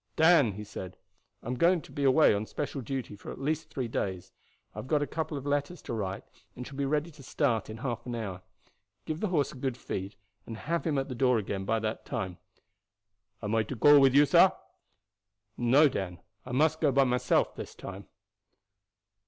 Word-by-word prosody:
"Dan," 160 - +5
he 105 +2 -7
said, 95 -3 -8 0.5
"I - - -9
am 125 - -1
going 170 +2 +3 0.2
away 140 0 +5
on 105 +1 -2
special 145 -2 -4
duty 130 -3 -4
for 100 - -11
at - - -9
least 155 +2 -2
three 130 -5 -3
days. 95 -5 -3 0.4
I - - -7
have - - -7
got 150 0 +2
a - - 0
couple 155 0 -3
of 140 - -7
letters 145 +4 -1
to - - -5
write, 100 -4 -3 0.3
and 125 - -7
shall 135 - -10
be 140 0 -1
ready 150 +4 -1
to 150 -2 -15
start 125 -5 0
in 110 - -7
half 120 0 -4
an 120 - -3
hour. 100 -5 -5 0.6
Give 155 0 -3
the 215 - 0
horse 160 -7 +1
a - - -12
good 130 -1 -2
feed 95 -4 -5 0.3
and 115 - -6
have 170 +7 -2
him 150 -3 +1
at 135 - -1
the 130 - -5
door 125 0 +3
again 100 -2 -3
by 115 +3 +1
that 110 0 -3
time." 95 -8 -4 1.0
"Am 105 +1 -2
I 115 - +3
to 130 - -5
go 145 +5 +7
with 135 -1 +5
you, 145 +1 +7
sah?" - - +6 1.0
"No, 130 +6 +5
Dan; 95 -9 -3 0.3
I - - -6
must 155 +5 +2
go 150 -3 +4
by 135 +1 +4
myself 125 -1 +1
this - - -8
time." 95 +1 -9
130 Hz, 205 wpm, -29 LUFS, 110-145 Hz, 1.0 s, go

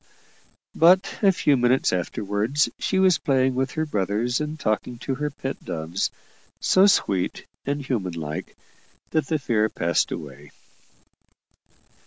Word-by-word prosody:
But 185 +4 +4
a 200 -2 +6
few 150 -5 +2
minutes 125 -2 +2
afterwards 105 - 0
she 190 - 0
was 185 -4 +4
playing 130 -1 +2
with 130 +1 -1
her 155 0 -1
brothers 110 - -1
and 150 +1 -4
talking 115 0 -1
to 135 - -3
her 150 +3 -2
pet 135 -1 -6
doves, 80 +3 -2 0.5
so 190 +2 +5
sweet 95 - +1 0.2
and 140 0 -2
humanlike, 85 - -4 0.6
that 155 -3 0
the 160 - +1
fear 110 -6 +1
passed 85 -4 0
away. - - -8
130 Hz, 130 wpm, -24 LUFS, 105-150 Hz, 0.6 s, a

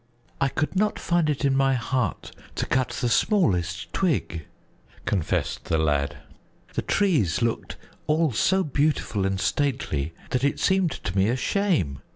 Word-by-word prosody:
"I 140 - +4
could 150 +6 -2
not 210 +2 +1
find 170 -3 +1
it 145 -1 0
in 135 -1 +3
my 135 0 +3
heart 125 -3 -2 0.2
to - - -1
cut 130 0 +1
the 125 - -2
smallest 90 - +1
twig," 125 - -1 0.6
confessed 95 -6 -1
the 80 - +1
lad. 75 -2 0 0.6
"The - - -1
trees 145 - +1
looked 115 -1 -2 0.3
all 155 0 +2
so 190 - +2
beautiful 145 - 0
and 95 0 -1
stately 95 - -1 0.2
that 125 0 0
it 140 - +1
seemed 190 -2 +3
to 95 - -5
me 95 +2 +3
a 120 - +1
shame. 145 - 0
130 Hz, 155 wpm, -25 LUFS, 95-155 Hz, 0.6 s, I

